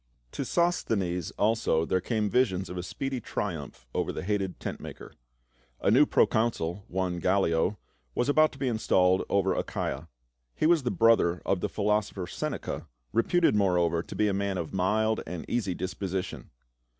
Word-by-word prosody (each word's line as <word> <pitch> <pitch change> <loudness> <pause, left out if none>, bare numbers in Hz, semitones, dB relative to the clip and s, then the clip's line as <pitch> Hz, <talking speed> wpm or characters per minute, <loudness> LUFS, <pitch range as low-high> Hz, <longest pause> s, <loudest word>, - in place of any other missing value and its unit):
To - - -3
Sosthenes 105 - 0
also 105 -7 +2
there 95 +2 +1
came 110 +1 0
visions 95 -6 +1
of 90 - -6
a - - -1
speedy 135 +8 -4
triumph 65 - -5
over - - -1
the - - -5
hated 95 -2 -2
tent - - -5
maker. - - -10 0.7
A - - +2
new 140 +6 +6
procon 115 +1 +3
sul, 85 +5 -4
one 90 -1 -2
Gallic, 90 0 +2 0.4
was 120 - +1
about 155 +2 +4
to - - -12
be 135 -1 -1
installed 95 -5 +3
over 95 -1 +2
Achaia. 70 -2 -3 0.5
He - - 0
was 165 -1 +5
the 125 - -1
brother 110 -8 +3
of 95 - +1
the - - -2
philosopher 105 -2 0
Seneca, - - -4 0.3
re 115 - +4
puted 175 +4 +3
moreover 90 -4 +2
to - - -9
be 105 - +2
a 100 - +1
man 100 -1 -1
of 85 0 -4
mild 105 +4 +1
and 85 0 -5
easy 100 -7 -1
dispo 95 +2 -4
sition. 95 0 -4
100 Hz, 175 wpm, -28 LUFS, 90-115 Hz, 0.7 s, new